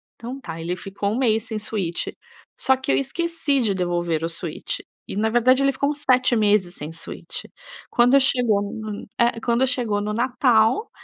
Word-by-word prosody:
Então 250 +3 -7
tá, 165 -9 -7
ele 170 +2 -3
ficou 195 +2 -3
1 230 - -1
mês 225 -4 +2
sem 225 -3 -4
Switch, 195 -5 -2 0.5
só 265 - +4
que 265 +1 -2
eu - - +3
esqueci 310 +1 0
de 210 -4 +1
devolver 175 -3 -1
o 165 - -1
Switch, 165 -1 -4 0.3
e - - -6
na 220 +2 +1
verdade 250 +3 +4
ele 275 - +4
ficou 280 +2 -1
uns 295 - -6
7 255 -1 +4
meses 205 -4 +2
sem 150 +2 -7
Switch. 165 0 -7 0.5
Quando 245 +3 +5
chegou 245 -6 +2
no, 215 -2 -6
eh, 235 -1 +2
quando 240 +3 +2
chegou 235 -6 0
no 210 +1 -2
Natal, 245 - +2
225 Hz, 185 wpm, -23 LUFS, 200-255 Hz, 0.5 s, Quando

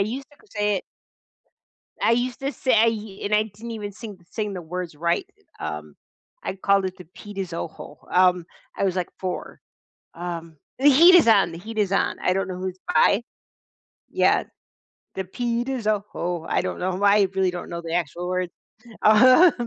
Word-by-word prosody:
used 245 +7 -2
to 295 +9 -23
say 210 -1 +1
it. - - -4 1.2
I - - +3
used 245 +2 -1
to 275 +1 -2
say 220 -4 +1
and 205 +1 +1
I 210 +1 +4
didn't 220 +2 -10
even 205 -2 -5
sing 210 -1 -9
sing 210 -3 -3
the 180 - -6
words 175 0 -5
right, 170 +3 0 0.3
eh, - - -4
um, 75 -1 -6 0.5
I - - -2
called 195 0 +2
it 185 0 -4
the 180 - -10
"Pita 205 -1 -6
zoho," 165 -4 -7
um, 180 -1 +4 0.3
I - - 0
was, 190 -2 0
like, 180 -2 -1
4. 185 -1 -5 0.5
Um, 165 -2 -6 0.2
The 275 +3 +5
Heat 335 +6 +8
Is 340 - +6
On, 200 -6 +5
The 165 - -7
Heat 220 +4 -8
Is 205 -3 +2
On, 195 - +1
I 185 - +2
don't 195 0 0
know 185 - -4
who 185 +1 -3
it's 185 0 -8 0.2
by. 195 +7 +4 0.9
Yes. - - +2 0.7
"The 190 - -2
pita 240 +6 -2
zoho," 205 -7 -2
I - - +2
don't - - -4
know 185 0 -1
why, 200 +2 +4
I 200 -2 +4
really 190 -1 +2
don't 175 - -7
know 170 0 -5
the 165 -1 -5
actual 175 +1 -2
words. 185 -1 -2 0.5
Um 255 +10 +7
195 Hz, 185 wpm, -24 LUFS, 180-220 Hz, 1.2 s, Heat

